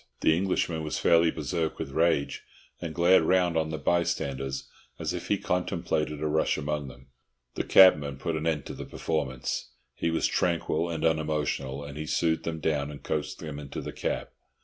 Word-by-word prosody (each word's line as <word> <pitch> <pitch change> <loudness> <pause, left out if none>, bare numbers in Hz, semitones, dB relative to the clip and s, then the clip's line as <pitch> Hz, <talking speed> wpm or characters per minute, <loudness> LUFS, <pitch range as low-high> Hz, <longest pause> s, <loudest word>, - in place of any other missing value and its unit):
The 80 - +4
Englishman 85 -2 0
was 75 - -2
fairly 85 0 +5
berserk 80 -1 -2
with 70 - -5
rage, 80 -1 +1 0.4
and 85 -3 -5
glared 90 +2 +6
round 90 +1 +2
on 80 -1 +1
the 80 - -3
bystanders 70 -7 -1 0.3
as - - -2
if - - -5
he - - +2
contemplated 85 -4 -1
a - - +1
rush 80 +1 +1
among 75 -1 -2
them. 65 0 -13 0.4
The - - -2
cabman 75 -7 +6
put 80 +4 -2
an 80 +1 -2
end 80 -4 0
to - - -6
the - - -7
performance. 65 -1 -3 0.2
He 85 - -1
was 80 - +1
tranquil 85 -1 +1
and 80 -1 -2
unemotional, 75 -3 0
and 70 +1 -8
he 75 - -4
soothed 80 0 +1
them 80 -1 -3
down 75 -2 0
and 75 -1 -9
coaxed 75 -1 -2
them 75 -3 -6
into 70 -2 -6
the - - -6
cab. - - -2
80 Hz, 185 wpm, -28 LUFS, 75-85 Hz, 0.4 s, glared